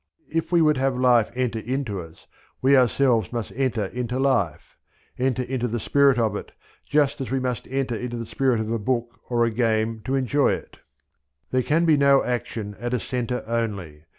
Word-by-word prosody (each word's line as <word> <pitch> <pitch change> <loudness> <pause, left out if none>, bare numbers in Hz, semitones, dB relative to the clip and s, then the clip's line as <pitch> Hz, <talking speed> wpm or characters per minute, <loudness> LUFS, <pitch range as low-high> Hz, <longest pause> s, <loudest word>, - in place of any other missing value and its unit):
If 165 +1 -1
we 170 -2 +5
would 150 -2 +3
have 135 -1 0
life 125 -3 +4
enter 125 -3 -1
into 120 -4 -3
us, 80 0 -14 0.3
we 135 +2 +4
ourselves 125 -4 +3
must 120 -3 -4
enter 125 -5 0
into 125 +4 -3
life 130 - 0 0.4
enter 130 0 +1
into 125 -1 -2
the 120 0 -2
spirit 140 +3 +3
of 110 -3 +1
it, - - -7 0.4
just 145 -2 +2
as 130 - -4
we 135 +1 0
must 125 -3 -3
enter 130 -2 -1
into 120 +1 -4
the 115 - -4
spirit 130 0 +1
of 110 0 -3
a 115 - 0
book 120 +2 -2
or 120 -1 +2
a 115 - 0
game 110 -1 0
to 135 +2 0
enjoy 135 +2 +2
it. - - -8 0.7
There 130 - +2
can 160 +6 +2
be 155 -3 +5
no 140 -1 +5
action 115 -4 -3
at 120 +1 -2
a - - -1
centre 125 0 -3
only. 100 -10 -3
125 Hz, 195 wpm, -24 LUFS, 115-135 Hz, 0.7 s, we